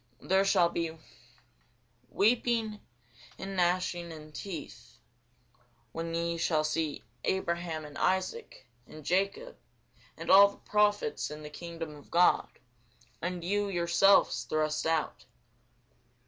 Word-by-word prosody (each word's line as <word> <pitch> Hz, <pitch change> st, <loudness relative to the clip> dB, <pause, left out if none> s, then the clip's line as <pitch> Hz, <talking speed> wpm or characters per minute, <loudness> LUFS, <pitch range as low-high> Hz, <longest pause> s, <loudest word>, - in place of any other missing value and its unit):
There 190 Hz, +1 st, +2 dB
shall 175 Hz, -3 st, +4 dB
be 165 Hz, -1 st, -3 dB, 1.1 s
weeping 225 Hz, 0 st, +1 dB, 0.6 s
and 195 Hz, 0 st, -6 dB
gnashing 175 Hz, -1 st, 0 dB
of 155 Hz, -1 st, -11 dB
teeth, 165 Hz, -3 st, -8 dB, 0.9 s
when 165 Hz, 0 st, -4 dB
ye 170 Hz, 0 st, -1 dB
shall 155 Hz, -2 st, +1 dB
see 155 Hz, 0 st, -2 dB, 0.2 s
Abraham, 170 Hz, -4 st, -2 dB
and 145 Hz, -1 st, -11 dB
Isaac, 190 Hz, -, -1 dB, 0.2 s
and 155 Hz, -2 st, -12 dB
Jacob, 195 Hz, -, -1 dB, 0.6 s
and -, -, -2 dB
all 200 Hz, +1 st, +9 dB
the 200 Hz, -, -10 dB
prophets, 205 Hz, -7 st, +1 dB
in 150 Hz, 0 st, -8 dB
the 150 Hz, -, -8 dB
kingdom 165 Hz, -1 st, -7 dB
of 145 Hz, -, -16 dB
God, 175 Hz, +1 st, +4 dB, 0.7 s
and 175 Hz, 0 st, -3 dB
you 205 Hz, +3 st, 0 dB
yourselves 175 Hz, +2 st, +3 dB
thrust 155 Hz, 0 st, -1 dB
out. 160 Hz, -1 st, -1 dB
170 Hz, 115 wpm, -30 LUFS, 160-195 Hz, 1.1 s, all